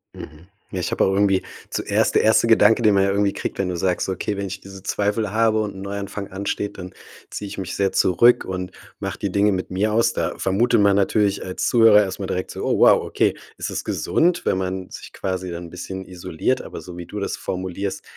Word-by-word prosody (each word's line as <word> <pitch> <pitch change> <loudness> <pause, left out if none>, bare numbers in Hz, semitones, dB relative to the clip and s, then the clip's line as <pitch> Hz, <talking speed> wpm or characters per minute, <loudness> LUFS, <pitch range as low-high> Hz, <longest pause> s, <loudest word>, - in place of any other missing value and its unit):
Mhm. 80 +3 -11 0.2
Ja, 95 - -3
ich 90 - -2
habe - - +1
auch 95 - +1
irgendwie 95 -1 +2 0.3
zuerst - - 0
der - - +4
1. 110 +1 +4
Gedanke, 115 0 +5
den 105 -3 +4
man 95 - +4
ja 100 - +2
irgendwie 100 0 +1
kriegt, - - -5
wenn 95 -2 0
du 90 - -3
sagst: 90 +1 0
„Okay, 95 +2 -2
wenn 100 0 -3
ich 95 +1 -7
diese 95 -1 -11
Zweifel 105 +1 -1
habe 110 0 +2
und 105 -2 -4
'n 95 - -8
Neuanfang 100 0 -5
ansteht, 100 +1 -3
dann 90 0 -8 0.4
ziehe 105 - -6
ich - - -8
mich 95 -2 -4
sehr 100 -1 +1
zurück 120 +7 +4
und 90 -1 -4 0.3
mache - - -5
die 100 - -2
Dinge 100 +1 +3
mit 95 -1 -3
mir 105 +3 0
aus.“ 115 +1 +3
Da - - -2
vermutet 105 +3 +2
man 100 -1 +4
natürlich 100 0 +1
als 90 - -2
Zuhörer 115 -3 +6
erst 95 0 -5
mal 100 - -3
direkt 95 0 -3
so: - - -6
„Oh - - +1
wow, - - +6
okay, - - +1 0.2
ist - - -4
es - - -4
gesund, 175 +1 +1
wenn - - +1
man 95 0 -3
sich - - -10
quasi 95 -1 -3
dann 85 0 -6
'n - - -10
bisschen 95 +2 -7
isoliert“, 90 +7 -2
aber - - -8
so 90 -1 -10
wie 85 - -7
du 105 - -6
das 100 - -3
formulierst, 95 +1 -4
100 Hz, 235 wpm, -22 LUFS, 95-105 Hz, 0.4 s, Zuhörer